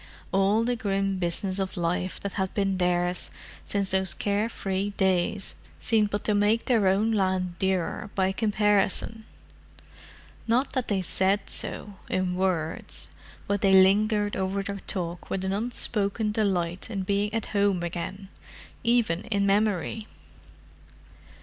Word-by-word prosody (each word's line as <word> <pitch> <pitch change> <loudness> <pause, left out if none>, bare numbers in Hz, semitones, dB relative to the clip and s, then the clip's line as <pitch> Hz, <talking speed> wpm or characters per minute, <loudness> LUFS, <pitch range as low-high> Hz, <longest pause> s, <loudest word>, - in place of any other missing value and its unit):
All 195 +3 +3
the 245 +1 0
grim 195 -3 -1
business 185 +2 -1
of 190 -1 -3
life 180 +2 -1
that 200 - -4
had 190 -1 -2
been 195 -2 0
theirs 180 0 +1 0.4
since 200 -2 -1
those 190 -3 +1
care 205 +5 0
free 195 -1 -3
days 190 +1 +1 0.3
seemed 215 -2 +2
but 205 0 -2
to 210 - +1
make 205 +3 +2
their 225 -6 +3
own 205 +4 +3
land 185 -4 0
dearer 190 +1 -1
by 190 -1 +2
comparison. 210 +1 +1 1.2
Not 245 +4 +1
that 260 -3 -1
they 195 -3 0
said 195 +3 +1
so, 205 -2 -4
in 185 -1 0
words. 180 -4 -2 0.4
But 200 -1 -1
they 195 -1 +4
lingered 205 +2 +4
over 190 +1 -1
their 200 0 -4
talk 175 -3 -3
with 190 0 -2
an 190 - 0
unspoken 210 -1 -1
delight 190 -4 -1
in 200 -4 -2
being 200 +2 0
at 225 -1 -2
home 200 -3 +2
again—even 190 +3 -3
in 200 -2 0
memory. 210 +1 +1
195 Hz, 135 wpm, -27 LUFS, 185-210 Hz, 1.2 s, they